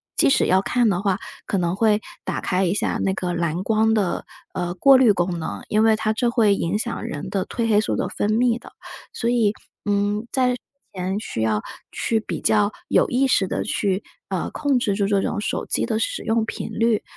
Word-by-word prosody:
即 - - +4
使 275 - +3
要 185 +1 +3
看 240 +3 +1
的 180 -3 +1
话， 195 -1 0 0.3
可 195 - -1
能 175 -1 0
会 210 0 +3 0.2
打 - - -3
开 185 +1 0
一 175 - +1
下 205 - -1
那 190 - +1
个 180 -2 -2
蓝 170 +1 -1
光 220 +1 +2
的， 205 -5 0 0.3
呃， 175 -1 -2
过 270 +9 +6
滤 255 -4 +6
功 175 -2 -1
能， 160 - -5
因 215 +1 +2
为 225 -1 +5
它 215 0 0
这 240 +2 +1
会 220 -4 +3
影 180 +2 -1
响 235 +1 -3
人 145 - -5
的 195 -2 -1
褪 230 -1 -2
黑 210 -2 +4
素 - - -1
的 - - -1
分 205 - -2
泌 235 +1 +2
的。 - - -14 0.4
所 235 - -1
以， 235 -4 +3 0.3
嗯， 205 +1 0
在 255 -1 +3
之 245 - -13 0.3
前 185 +1 -2
需 115 - -4
要 110 -1 +1 0.3
去 225 - 0
比 220 - -5
较 210 -1 +3 0.2
有 - - +3
意 260 +2 +2
识 200 -7 +2
的 - - -2
去， 195 -1 -1 0.3
呃， - - -2
控 285 -3 +1
制 210 -4 0
住 200 -1 +1
这 200 -1 +2
种 210 - -2
手 210 - -2
机 - - 0
的 225 -2 -1
使 - - -2
用 225 0 +1
频 - - -5
率。 230 -1 +1
210 Hz, 240 characters per minute, -22 LUFS, 190-230 Hz, 0.4 s, 过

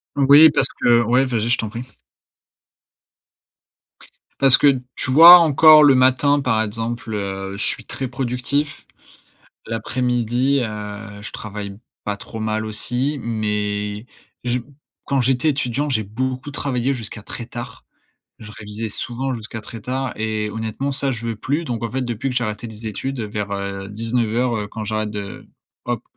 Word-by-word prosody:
Oui, 145 +3 +7
parce 135 - +8
que 120 -1 +5
ouais, 125 +4 +2
vas-y, 120 -3 -1
je 120 - +3
t'en 110 - -3
prie. 115 +3 -6 2.6
Parce 135 -2 +7
que, - - +4 0.3
tu 130 - -3
vois 170 +6 +11
encore 155 -1 +7
le 140 -2 +6
matin, 130 +3 +3
par 125 -5 +1
exemple, 115 +1 -4
heu, 95 -1 -4
je 105 - -2
suis - - -2
très 135 - -5
productif. 130 +3 -2 0.8
L'après-midi, 125 +3 0
heu, 105 -1 -7
je - - -8
travaille 100 -2 -7 0.3
pas 105 -1 -2
trop 110 - -9
mal 110 0 -2
aussi, 125 +6 -3
mais 105 -1 -3 0.4
je 125 +1 0 0.4
quand 140 - 0
j'étais 130 +4 +2
étudiant, 140 0 -1
j'ai 110 -6 0
beaucoup 130 +6 -4
travaillé 135 -2 -1
jusqu'à 110 -3 -7
très 120 - -8
tard. 120 -1 -9 0.5
Je 105 -2 -11
révisais 105 +1 -6
souvent 130 +5 -3
jusqu'à 110 -1 -7
très 115 +1 -10
tard 130 +4 -3
et 110 -1 -2
honnêtement 110 +6 -4
ça, 135 0 0
je 115 -1 -6
veux 115 - -2
plus. 145 +8 -2
Donc 120 -6 -4
en 115 - -6
fait, 130 - -2
depuis 120 +2 -3
que 125 - -5
j'ai 120 - +1
arrêté 105 +2 -4
les 110 0 -11
études 130 +4 -4
vers, 105 -1 -4
heu, 100 0 -4
19:00, 115 +2 -1
heu, 105 -1 -4
quand 110 +1 -7
j'arrête 110 0 -2
de 100 -2 -7 0.4
hop, 120 -2 -2
115 Hz, 160 wpm, -20 LUFS, 105-130 Hz, 2.6 s, vois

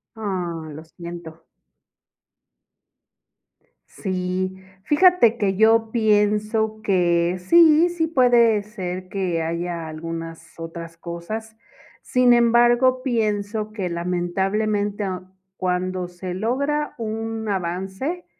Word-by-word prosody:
Ah, 180 -7 -4
lo 155 - -9
siento. 170 -1 -10 2.4
Sí, 185 0 -3 0.3
fíjate 295 - +4
que, 195 -3 0
yo 225 +1 +4
pienso 215 0 +1
que 175 -3 +2
sí, 325 - +5
sí 340 -2 -1
puede 240 -7 +4
ser 185 -3 -6
que 180 -4 -1
haya 170 0 -3
algunas 165 +1 -7
otras 165 0 -8
cosas, 215 +7 -7 0.4
sin 250 -1 +3
embargo, 240 +2 +4
pienso 215 -3 -1
que 190 -4 -3
lamentablemente, 195 +4 -1
a 185 -2 -4 0.3
cuando 185 0 -2
se 180 +1 -7
logra 280 +9 -1
un 225 0 -4
avance, 190 - -3
205 Hz, 95 wpm, -22 LUFS, 175-225 Hz, 2.4 s, sí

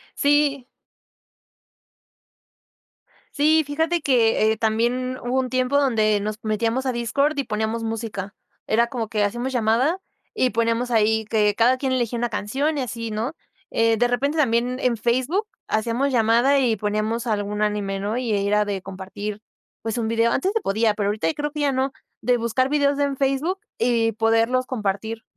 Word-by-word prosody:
Sí 285 -2 +2 2.7
Sí, 310 +2 +3
fíjate 320 +3 0
que, 225 -4 +3
eh, - - -3
también 240 +3 0
hubo 255 +2 0
un 255 - -2
tiempo 255 +2 +1
donde 215 -6 +2
nos 215 +1 -3
metíamos 225 +4 0
a 260 - 0
Discord 240 +6 +1
y 275 - 0
poníamos 220 +2 -2
música, 220 -3 -4 0.3
era 235 +2 +2
como 235 -4 -4
que 210 -2 0
hacíamos 240 +5 -2
llamada, 245 +10 +2 0.3
y 255 -11 +2
poníamos 230 +2 0
ahí 220 -1 +2
que 210 -1 +2
cada 245 +4 +3
quien 265 -1 -1
elegía 240 -2 -1
una 240 - 0
canción, 265 +9 -1
y 270 - -1
así, 230 -2 -5
¿no? 225 +8 -3 0.4
Eh, 230 0 +2
de 245 - +3
repente 275 +6 0
también 250 -3 +1
en 240 -3 +1
Facebook 260 - 0 0.2
hacíamos 235 +5 0
llamada 240 +4 +4
y 235 -4 +2
poníamos 215 +3 -2
algún 210 -1 -1
anime, 205 -2 -1
¿no? 205 +2 -2
Ahí 220 -5 0
era 210 0 +2
de 195 -2 -3
compartir, 200 +2 -6 0.4
pues 225 +1 -3
un 225 -2 -1
video, 230 +1 +2
antes 375 - 0
se 450 - 0
podía, 220 - +1
pero 205 -1 -1
ahorita 185 -6 0
creo 295 0 -4
que 300 - -5
ya 285 -2 +2
no, 265 +1 0 0.3
de 245 +2 +2
buscar 235 +3 0
videos 285 -1 +2
en 280 -1 0
Facebook 275 +8 0 0.2
y 230 -1 +2
poderlos 225 +3 +2
compartir 220 -1 -3
235 Hz, 170 wpm, -23 LUFS, 215-260 Hz, 2.7 s, llamada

